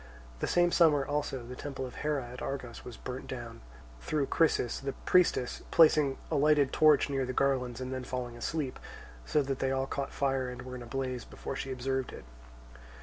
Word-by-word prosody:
The - - -1
same 175 0 +3
summer 150 -6 +5
also 145 -3 -2
the 125 +1 -7
temple 135 -1 -5
of 125 - -9
Hera 150 -4 -1
at 125 +1 -9
Argos 125 -4 -5
was 120 - -9
burnt 125 +1 -6
down, 120 -2 -7 0.4
through 150 - 0
Chrysis, 150 -6 +2
the 135 0 -3
priestess, 175 -8 +2
placing 150 -4 +5
a - - +1
lighted 145 -1 +4
torch 155 -2 +5
near 135 -2 0
the 130 0 -3
garlands 125 -3 +1
and 130 0 -4
then 130 -1 -4
falling 125 -1 -4
asleep, 135 +2 -3 0.5
so 150 - +2
that 135 -1 -3
they 135 - +1
all 135 0 0
caught 140 +1 -3
fire 135 -2 0
and 125 0 -7
were 130 0 -8
in 125 - -6
a 120 - -8
blaze 130 0 -3
before - - -7
she 135 - -4
observed 130 0 -2
it. - - -10
135 Hz, 200 wpm, -31 LUFS, 125-145 Hz, 0.5 s, summer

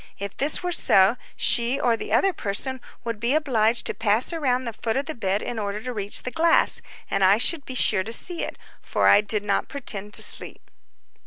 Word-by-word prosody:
If 200 0 -7
this 295 +5 +2
were 355 - -2
so, 195 - +4 0.2
she 240 +3 +2
or 240 -3 +1
the - - -8
other 390 -1 +2
person 255 +4 -3 0.2
would 230 -2 -5
be 235 +5 0
obliged 240 -7 +1
to - - 0
pass 225 +8 +1
around 260 -6 -1
the 230 - -5
foot 225 +2 -3
of 275 - -2
the 315 - -5
bed 200 -4 -2
in 235 - -5
order 205 0 -4
to 250 - -5
reach 205 -2 -3
the 250 - -5
glass, 330 +6 +2 0.3
and 195 - 0
I 195 +2 +5
should 285 +5 +2
be 260 - -7
sure 210 -6 +3
to 225 - -8
see 340 +8 +1
it, - - -6 0.2
for - - 0
I 205 - +6
did 210 0 -2
not 200 -1 -1
pretend 210 -7 -4
to - - +2
sleep. - - +1
235 Hz, 220 wpm, -23 LUFS, 205-270 Hz, 0.3 s, I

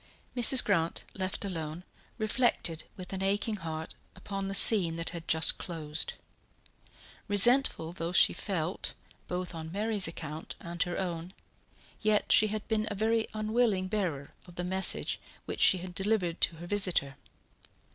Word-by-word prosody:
Mrs. 250 +1 +7
Grant, 170 -5 0
left 190 +1 -3
alone, 165 -2 -5 0.3
reflected 215 -7 0
with 185 0 -8
an 190 - -4
aching 205 +3 0
heart 160 -2 -6 0.2
upon 195 +1 -5
the 195 - -2
scene 185 -7 +5
that 165 0 -4
had 170 -1 -8
just 160 0 +4
closed. 160 -3 -2 1.1
Resentful 205 -5 +4
though 170 -1 -3
she - - +5
felt 180 -3 -3 0.3
both 180 0 -4
on 160 -1 -7
Mary's 210 0 0
account 155 -1 -7
and 170 0 -7
her 175 -1 -1
own, 175 -1 -4 0.7
yet 215 -1 +1
she 215 - +7
had 215 0 -5
been 215 -1 0
a 205 - -4
very 220 +2 +1
unwilling 215 -3 +1
bearer 180 -9 -3
of 175 - -14
the 180 - -3
message 190 +1 0 0.3
which - - -5
she 190 - +6
had 180 0 -7
delivered 190 -3 -1
to 170 - +3
her 170 +2 -9
visitor. 180 -8 0
185 Hz, 150 wpm, -30 LUFS, 165-210 Hz, 1.1 s, Mrs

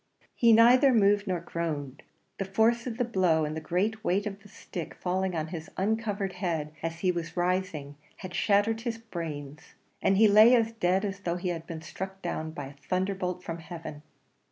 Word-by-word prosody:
He 235 -1 +4
neither 245 +4 +6
moved 205 -1 +3
nor 180 -2 0
groaned; 155 -6 -4 0.4
the 195 - -1
force 225 +5 +2
of 230 -2 -4
the 245 - +1
blow, 180 -8 +2
and 150 +1 -4
the 160 - -4
great 200 +8 -1
weight 195 +4 +1
of 200 -1 -5
the 205 - -16
stick 175 -3 -7
falling 185 0 -1
on 160 -1 -2
his 160 -2 -7
uncovered 205 -1 -1
head 160 -5 -2
as 165 +1 -4
he 185 - +3
was 170 0 -5
rising, 175 -5 -1 0.2
had 185 -2 -8
shattered 210 +2 +2
his 230 -1 -3
brains, 160 -7 -7 0.3
and 195 - +3
he 220 +1 +7
lay 215 +4 +8
as 225 -1 +2
dead 190 -2 +1
as 200 0 -4
though 175 -3 -2
he 180 0 -3
had 165 -1 -4
been 160 -1 -7
struck 190 +4 -6
down 160 -2 -3
by 145 -3 -6
a 135 - -10
thunder 190 +2 0
bolt 180 -1 -4
from 165 -1 -5
heaven. 160 -3 -8
185 Hz, 200 wpm, -28 LUFS, 165-210 Hz, 0.4 s, lay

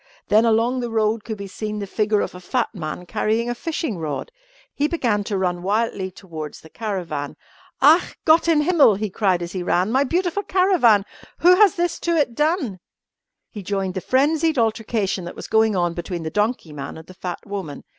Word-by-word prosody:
Then 215 +2 +5
along 230 +3 +2
the 240 -1 -3
road 220 -1 0
could 220 -2 -5
be 200 - -6
seen 210 +2 -5
the 205 - -3
figure 210 +1 +1
of - - -3
a 180 - -9
fat 235 +7 -2
man 170 -2 -6
carrying 225 +6 0
a - - 0
fishing 305 - -3
rod. 155 - -4 0.4
He 290 - +1
began 235 -11 0
to 200 -2 -2
run 180 -2 -1
wildly 200 0 -1
towards 160 -5 -8
the 160 - -16
caravan. 175 -10 -4 0.5
"Ach! 315 +5 +5
Gott 320 +2 +5
in 320 -3 +4
Himmel!" 300 - +5
he 210 0 -3
cried 185 -4 +1
as 170 - -6
he 185 - -4
ran, 180 +3 +1
"my 265 +3 +3
beautiful 355 +6 0
caravan! 365 - +3 0.4
Who 360 +2 +7
has 400 -2 +5
this 345 0 -1
to 340 -1 0
it 290 -6 +1
done?" 295 - 0 0.7
He 210 - -7
joined 195 -1 -2
the 185 - -4
frenzied 305 - +2
altercation 220 -4 0
that 175 - -7
was - - -8
going 220 -1 +2
on 175 -2 +1
between 175 0 -5
the 160 - -4
donkey 210 -6 -1
man 145 +1 -7
and 160 - -11
the 185 - -13
fat 180 -1 -6
woman. 195 -9 -6
215 Hz, 200 wpm, -22 LUFS, 185-265 Hz, 0.7 s, Who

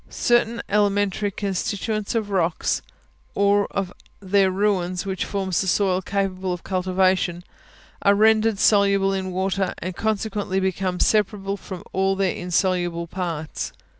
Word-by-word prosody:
certain 235 -1 +1
elementary 205 0 +1
constituents 205 +2 -2
of 215 -3 -1
rocks, 175 -4 0 0.5
or 200 0 +3
of 190 -2 -3 0.3
their 195 0 +2
ruins, 185 -2 0
which 190 -1 -2
form 195 -2 -3
the - - -5
soil 190 +1 +2
capable 190 -1 -2
of 180 -1 -4
cultivation, 185 -1 +1 0.6
are 200 0 +4
rendered 220 0 +4
soluble 200 -1 +3
in 190 -1 -2
water, 190 +1 -1
and 185 +1 -5
consequently 210 -2 -1
become 190 -1 -1
separable 205 -2 +1
from 190 -2 -8
all 190 0 +1
their 195 -2 +1
insoluble 175 -1 0
parts. 170 -3 -4
195 Hz, 130 wpm, -23 LUFS, 185-205 Hz, 0.6 s, are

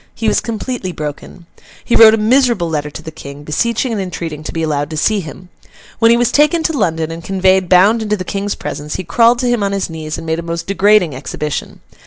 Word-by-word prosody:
He 225 - -2
was - - +3
completely 230 -3 -4
broken. 150 +3 -7 0.4
He 235 - +1
wrote 220 -1 +8
a - - -3
miserable 230 -4 +2
letter 150 -2 -2
to - - -10
the 160 - -7
King, 140 -1 -10
beseeching 235 - -1
and 215 -3 -2
entreating 165 -5 -5
to - - -4
be 165 - -3
allowed 145 -2 -1
to 155 - -5
see 210 +7 +1
him. 180 +1 -9 0.5
When 230 0 +5
he 235 - +5
was 240 -1 +1
taken 300 +3 +3
to 320 - 0
London, 165 - -1
and 165 0 -7
conveyed 190 -1 +2
bound 200 +5 +5
into 210 -1 -1
the 185 - -4
King's 200 +2 -3
presence, 150 0 -6
he - - -4
crawled 230 +8 +3
to 250 - 0
him 240 -2 +1
on 200 0 -1
his 195 -3 -2
knees, 155 -1 -5
and - - -8
made 160 0 -1
a - - -3
most 170 0 -5
degrading 195 -4 +3
exhibition. 150 +2 -5
185 Hz, 235 wpm, -16 LUFS, 160-225 Hz, 0.5 s, wrote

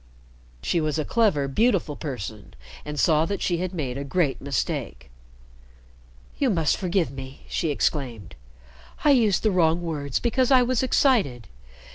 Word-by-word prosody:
She 170 - +1
was 155 0 -1
a 155 - -1
clever, 195 -12 +2
beautiful 190 - +1
person, 110 - -7 0.3
and 150 -1 -5
saw 160 0 +3
that 200 - -2
she 175 - +1
had 185 0 -2
made 140 -7 -4
a - - -3
great 140 0 0
mistake. - - -3 1.3
"You 275 - +2
must 165 -8 +2
forgive 180 -5 0
me," 135 0 -10
she 165 - -1
exclaimed. 135 -7 -2 0.7
"I 295 - +5
used 225 -8 +3
the 215 - +3
wrong 170 -2 +2
words 145 -5 -2
because 245 +1 +1
I 260 -2 +6
was 250 -1 +1
excited. 210 - +1
160 Hz, 150 wpm, -24 LUFS, 140-205 Hz, 1.3 s, I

